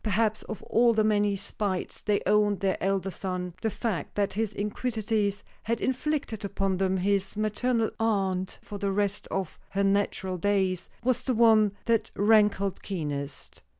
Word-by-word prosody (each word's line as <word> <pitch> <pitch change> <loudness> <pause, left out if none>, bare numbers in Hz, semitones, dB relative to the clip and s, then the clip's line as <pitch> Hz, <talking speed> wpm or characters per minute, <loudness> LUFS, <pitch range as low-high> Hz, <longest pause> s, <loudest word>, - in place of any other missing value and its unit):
Perhaps 220 +1 +1
of 220 - -6
all 235 +1 +4
the 215 -1 +3
many 205 -1 +2
spites 195 -1 -3
they 205 -1 +1
owed 205 0 +3
their 195 -1 +2
elder 195 0 0
son, 180 -2 -4
the 220 - +1
fact 200 -8 -3
that 200 -1 0
his 220 0 -1
iniquities 210 -1 -1 0.2
had 230 +1 -1
inflicted 260 -4 -1
upon 195 -1 -1
them 190 0 +1
his 195 +1 0
maternal 220 +2 +1
aunt 195 -4 0
for 205 - -7
the 200 0 0
rest 200 0 -1
of 190 -4 -3
her 200 +1 0
natural 195 -2 0
days, 190 -2 0
was 250 -1 +2
the 255 - -1
one 220 -3 +5
that 225 -2 +2
rankled 205 -2 +3
keenest. 145 -7 -5
205 Hz, 155 wpm, -28 LUFS, 195-220 Hz, 0.2 s, one